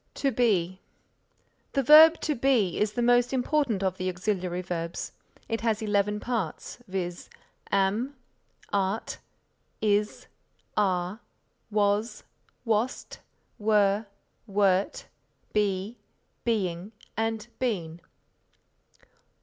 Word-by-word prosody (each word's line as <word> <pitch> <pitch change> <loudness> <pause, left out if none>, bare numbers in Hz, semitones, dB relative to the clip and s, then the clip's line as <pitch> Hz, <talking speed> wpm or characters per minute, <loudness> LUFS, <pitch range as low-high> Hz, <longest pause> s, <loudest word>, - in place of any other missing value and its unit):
TO 275 - 0
BE 190 -7 +1 0.9
The 275 - +1
verb 315 +4 +9
To 305 - 0
Be 245 - +2
is 210 0 +1
the 240 - -1
most 245 0 +4
important 260 -5 +1
of 190 -1 0
the 185 0 -1
auxiliary 180 -1 -2
verbs. 170 -1 -4 0.4
It 225 - -2
has 220 -2 +1
eleven 210 -1 0
parts, 225 -4 -4
viz., 180 -2 -4 0.4
am, 205 +8 +1 0.6
art, 200 +2 -1 0.6
is, 210 0 0 0.5
are, 185 0 0 0.5
was, 210 +1 0 0.4
wast, 225 +3 -1 0.4
were, 210 0 +2 0.4
wert; 195 -1 +1 0.5
be, 205 +2 0 0.5
being 195 -3 -1 0.2
and 225 -1 -1
been. 175 -10 -2
210 Hz, 95 wpm, -27 LUFS, 185-230 Hz, 0.9 s, verb